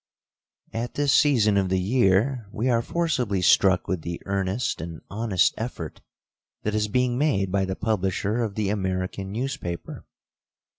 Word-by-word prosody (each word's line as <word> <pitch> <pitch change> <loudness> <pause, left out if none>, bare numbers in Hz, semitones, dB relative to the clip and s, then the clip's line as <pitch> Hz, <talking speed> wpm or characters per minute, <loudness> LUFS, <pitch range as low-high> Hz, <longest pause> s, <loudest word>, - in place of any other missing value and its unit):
At 115 +2 -4
this 145 -1 +2
season 115 -9 +4
of 95 -1 +1
the 95 0 +1
year, 110 +3 +2
we 125 +5 0
are 115 -1 +3
forcibly 125 - -1
struck 95 +1 +4
with 90 -2 -1
the 85 +1 -5
earnest 100 +1 -1
and 85 0 -7
honest 105 -3 +2
effort 110 -9 -5 0.6
that 105 - -1
is 105 0 +1
being 125 +3 +1
made 100 -11 +1
by 95 0 +1
the 95 0 -3
publisher 105 +1 -1
of 110 -4 -2
the 105 -3 0
American 95 -1 -2
newspaper. 110 -7 -5
100 Hz, 150 wpm, -25 LUFS, 95-120 Hz, 0.6 s, season